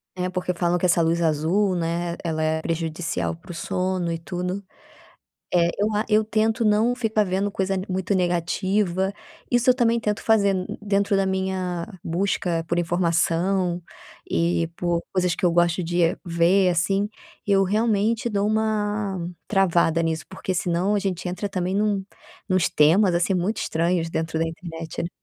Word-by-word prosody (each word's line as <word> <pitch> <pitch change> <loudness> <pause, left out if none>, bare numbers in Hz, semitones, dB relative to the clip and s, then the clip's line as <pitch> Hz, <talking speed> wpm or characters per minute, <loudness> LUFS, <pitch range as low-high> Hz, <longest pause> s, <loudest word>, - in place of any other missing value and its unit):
É, 180 0 -2
porque 180 0 -2
falam 175 0 +1
que 180 - -1
essa 170 -1 +3
luz 165 +1 +1
azul, 170 +5 +1
né, 170 0 -2
ela 160 -2 -2
é 155 0 0
prejudicial 165 +1 -2
para 165 +2 -12
o - - -6
sono 180 0 -2
e 165 - -2
tudo. 180 +3 -4 0.9
Eh, 170 -1 +4
eu 210 +1 +1
a 210 +1 +1
eu 215 +1 +5
tento 220 +1 +1
não 220 +3 +3
ficar 220 -4 +1
vendo 195 +2 -1
coisa, 195 0 -1
né, - - -3
muito 190 +1 -1
negativa, 185 +2 0 0.4
isso 245 +1 +4
eu - - +5
também 235 -2 +2
tento 210 -1 -1
fazer, 205 -3 +3
hum, 185 -1 -2 0.2
dentro 200 -1 +1
da 195 - +2
minha 190 -2 -2 0.2
busca 175 -1 0
por 170 - 0
informação 175 +1 +1 0.5
e 170 0 +1
por 175 -1 0
coisas 180 -2 +1
que 180 - 0
eu - - +4
gosto 175 +1 +2
de 175 +1 0 0.2
ver, 175 +2 +3
assim. 195 +4 +1 0.4
Eu 195 -1 +4
realmente 220 +3 +1
dou 205 -2 0
uma 210 -2 0 0.3
travada 170 -4 +2
nisso, 160 -3 -1
porque 190 0 -4
senão 180 +2 0
a - - +2
gente 190 -3 -3
entra 185 +3 -3
também 185 -1 -2
num 205 -1 +1 0.4
nuns 185 -3 +2
temas, 175 +5 +4
assim, 175 +3 +1
muito 190 +4 0
estranhos 165 0 0
dentro 160 0 -2
da 165 - +1
internet. 165 0 -6
185 Hz, 165 wpm, -24 LUFS, 170-200 Hz, 0.9 s, eu